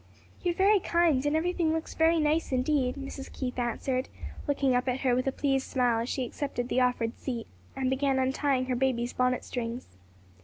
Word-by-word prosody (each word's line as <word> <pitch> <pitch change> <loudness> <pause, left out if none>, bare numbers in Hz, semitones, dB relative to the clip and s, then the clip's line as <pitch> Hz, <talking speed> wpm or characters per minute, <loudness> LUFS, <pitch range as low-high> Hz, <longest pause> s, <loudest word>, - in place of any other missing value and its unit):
"You 355 - +1
are - - -20
very 400 +3 +5
kind, 340 -7 +2
and 295 - +1
everything 335 0 +1
looks 320 0 -3
very 325 +1 +3
nice 305 +1 +1
indeed," 255 0 +1
Mrs. 275 -1 -7
Keith 250 -1 -4
answered, 255 +2 -1 0.4
looking 275 -2 +2
up 250 +1 +1
at 255 +1 0
her 255 -2 +2
with 255 +2 0
a - - +3
pleased 270 -1 0
smile 245 -3 +2
as 235 - -4
she 260 - -1
accepted 245 -1 -4
the 255 - +2
offered 245 -2 0
seat, 240 -4 -4 0.3
and 265 -1 -1
began 265 +1 +1
untying 265 0 +1
her 255 -1 -1
baby's 245 -2 0
bonnet 250 0 +1
strings. 235 - -5
265 Hz, 195 wpm, -29 LUFS, 250-290 Hz, 0.4 s, very